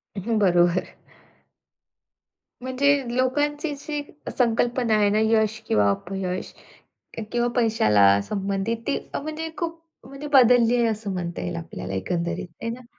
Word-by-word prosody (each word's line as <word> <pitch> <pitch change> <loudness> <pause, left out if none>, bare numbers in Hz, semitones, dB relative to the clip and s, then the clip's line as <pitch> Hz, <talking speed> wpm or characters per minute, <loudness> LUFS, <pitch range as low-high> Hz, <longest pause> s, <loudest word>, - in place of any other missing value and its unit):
हं, 220 +3 -1
बरोबर. 175 -2 +3 1.8
म्हणजे 260 -1 +1
लोकांची 290 +4 0
जी 295 +1 -5 0.4
संकल्पना 240 -1 +1
आहे 205 -1 +3
ना, 210 - +2
यश 220 0 +2
किंवा 100 -1 +3
अपयश 185 - -4 0.6
क - - -3
किंवा 240 0 +1
पैशाला 110 - +4
संबंधित 200 - -2
ती 285 - +1 0.2
अ, - - -1
म्हणजे 310 +2 -5
खूप 335 -1 -4 0.3
म्हणजे 275 +2 -8
बदलली 245 -2 +6
आहे 235 - +3
असं 215 -3 -3
म्हणता 175 -2 -4
येईल 175 - -4
आपल्याला 165 - -6
एकंदरीत 170 - -2
आहे 230 - -3
ना. 240 +1 -7
225 Hz, 135 wpm, -24 LUFS, 185-255 Hz, 1.8 s, बदलली